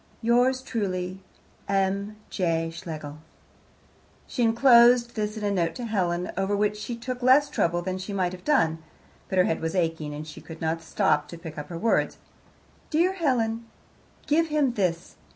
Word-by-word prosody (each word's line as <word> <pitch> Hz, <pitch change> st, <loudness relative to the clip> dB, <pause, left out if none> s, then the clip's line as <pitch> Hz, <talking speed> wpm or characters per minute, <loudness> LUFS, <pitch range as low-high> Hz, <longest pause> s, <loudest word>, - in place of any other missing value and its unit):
Yours 250 Hz, +3 st, +3 dB
truly, 185 Hz, -6 st, -3 dB, 0.5 s
M. 200 Hz, +1 st, 0 dB, 0.2 s
J. 165 Hz, -3 st, 0 dB
Schlegel 155 Hz, -3 st, -7 dB, 1.1 s
She 250 Hz, -, -4 dB
enclosed 235 Hz, 0 st, +6 dB
this 210 Hz, 0 st, -2 dB
in 215 Hz, -, -5 dB
a 205 Hz, -, +1 dB
note 170 Hz, -4 st, 0 dB
to 245 Hz, -, -5 dB
Helen, 180 Hz, -5 st, -1 dB
over 195 Hz, +2 st, 0 dB
which 210 Hz, 0 st, +1 dB
she 210 Hz, +3 st, -5 dB
took 250 Hz, +2 st, -5 dB
less 265 Hz, +4 st, +5 dB
trouble 175 Hz, +1 st, 0 dB
than 185 Hz, +1 st, -3 dB
she 190 Hz, +3 st, -6 dB
might 185 Hz, -3 st, 0 dB
have 180 Hz, 0 st, -10 dB
done; 165 Hz, -, +2 dB, 0.5 s
but 190 Hz, -, -2 dB
her 180 Hz, -, +6 dB
head 165 Hz, -, -1 dB
was 160 Hz, +2 st, -2 dB
aching, 160 Hz, -4 st, -1 dB
and 150 Hz, +1 st, -6 dB
she 150 Hz, -, -10 dB
could 160 Hz, -1 st, -10 dB
not 165 Hz, 0 st, -1 dB
stop 150 Hz, -2 st, +1 dB
to 170 Hz, -, -9 dB
pick 165 Hz, -2 st, -8 dB
her 155 Hz, +3 st, -7 dB
words: 225 Hz, +6 st, +1 dB, 0.7 s
Dear 340 Hz, +4 st, +2 dB
Helen, 235 Hz, -9 st, 0 dB, 0.6 s
Give 325 Hz, +3 st, +2 dB
him 300 Hz, -5 st, +1 dB
this. 180 Hz, -5 st, -2 dB
195 Hz, 170 wpm, -26 LUFS, 170-235 Hz, 1.1 s, enclosed